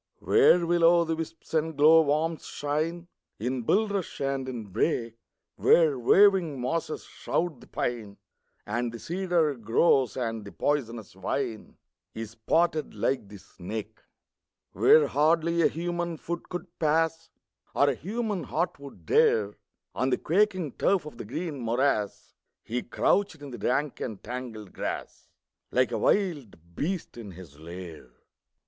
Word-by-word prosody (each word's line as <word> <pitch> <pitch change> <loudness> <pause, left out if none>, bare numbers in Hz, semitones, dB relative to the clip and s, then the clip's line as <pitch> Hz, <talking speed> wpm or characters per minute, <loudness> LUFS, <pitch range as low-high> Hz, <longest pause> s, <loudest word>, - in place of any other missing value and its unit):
Where 180 - +4
will 170 0 +1
o' 170 +1 +6
the 165 0 -1
wisps 165 0 -8
and 160 -1 0
glowworms 155 +1 +4
shine, 160 +4 -2 0.3
In 125 +3 -2
bulrush 200 - 0
and 135 -1 -2
in 120 -4 -5
brake; 115 - -1 0.4
Where 155 -6 +4
waving 180 - +4
mosses 155 +6 -2
shroud 170 -5 -3
the - - -15
pine, 110 -5 -3 0.5
And 120 +3 -2
the 115 - -7
cedar 175 0 0
grows, 125 +1 +2
and 115 -3 -2
the 100 - -10
poisonous 120 -7 -2
vine 110 +4 -4 0.4
Is 110 -1 -6
spotted 155 +8 0
like 125 -6 -1
the 100 0 -11
snake; 110 +4 -8 0.7
Where 155 -1 +6
hardly 165 +4 +2
a - - +6
human 175 0 -3
foot 170 +3 -6
could 175 -1 -7
pass, 165 +1 +1 0.5
Or 140 - +4
a 140 - +3
human 210 - -3
heart 170 0 -2
would 135 - -12
dare, 105 +5 +3 0.4
On 130 - 0
the - - +2
quaking 185 -3 +1
turf 190 -5 +2
of 150 - -10
the - - -6
green 150 - -4
morass 115 -3 -1 0.3
He 120 +2 -3
crouched 195 +7 +1
in 145 -2 -9
the 120 - -8
rank 140 +2 -1
and 105 -4 -5
tangled 115 -4 -7
grass, - - -5 0.4
Like - - +2
a - - -1
wild 130 - -1
beast 175 -4 -3
in 105 -5 -8
his 85 -5 -13
lair. 85 -4 -9
145 Hz, 140 wpm, -27 LUFS, 115-170 Hz, 0.7 s, o